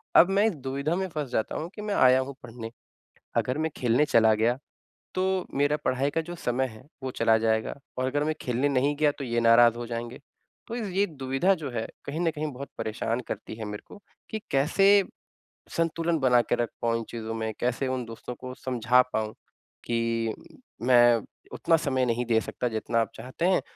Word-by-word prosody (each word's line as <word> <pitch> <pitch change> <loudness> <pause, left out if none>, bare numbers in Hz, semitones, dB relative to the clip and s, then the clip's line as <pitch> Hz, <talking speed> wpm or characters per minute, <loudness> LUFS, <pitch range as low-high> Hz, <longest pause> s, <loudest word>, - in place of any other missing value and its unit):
अब 175 - +8
मैं 200 +2 +3
इस 200 - -1
दुविधा 140 +4 -2
में 190 0 -1
फस 145 -4 -2
जाता 110 - -1
हूँ 165 +3 -4
कि 210 - -7
मैं 210 -1 -2
आया 130 0 +6
हूँ 135 +1 -6
पढ़ने, 115 -1 -7 0.7
अगर 130 +4 +1
मैं 160 0 0
खेलने 125 +4 +3
चला 110 -4 +5
गया 115 +3 +2 0.6
तो 185 - +1 0.3
मेरा 145 +2 +2
पढ़ाई 130 +2 +1
का 165 - 0
जो 175 +2 -7
समय 130 -4 0
है 110 +1 -13 0.2
वो 130 - -2
चला 115 -2 +3
जाएगा 110 0 +1 0.2
और 130 - 0
अगर 145 +2 0
मैं 155 - +1
खेलने 125 +3 0
नहीं 140 +2 +2
गया 150 -1 +4
तो - - -3
ये 120 -2 0
नाराज़ 115 0 +6
हो 120 - -4
जाएँगे। 120 +2 -5 0.5
तो 230 - -5
इज़ 225 -4 -3
ये 195 +2 +2
दुविधा 135 +5 +1
जो 150 -5 -5
है 115 -2 -3 0.2
कहीं 150 +4 -4
न 165 -2 +2
कहीं 150 -1 -3
बहुत 140 +2 -7
परेशान 115 +2 -2
करती - - -5
है 110 -1 -6
मेरे 105 0 -6
को 205 - -12 0.3
कि 220 - -3
कैसे 195 +9 +5 0.7
संतुलन 165 0 +1
बना 125 -2 +5
के 120 - 0
रख 120 -2 -1
पाऊँ 115 0 +2
इन 115 - -5
चीज़ों 115 -1 -5
में। 110 -1 -2
कैसे 125 +2 0
उन 130 -1 -2
दोस्तों 115 +2 -7
को 130 +1 -8
समझा 125 -1 +3
पाऊँ 110 0 -2 0.5
कि, 115 -1 0 0.5
मैं 120 -2 +6 0.3
उतना 165 - +3
समय 130 -5 0
नहीं 120 +1 0
दे 115 -1 +3
सकता 125 - -3
जितना 115 +1 -1
आप 115 - -1
चाहते 130 +7 -3
हैं। 185 - +3
130 Hz, 205 wpm, -27 LUFS, 115-150 Hz, 0.7 s, अब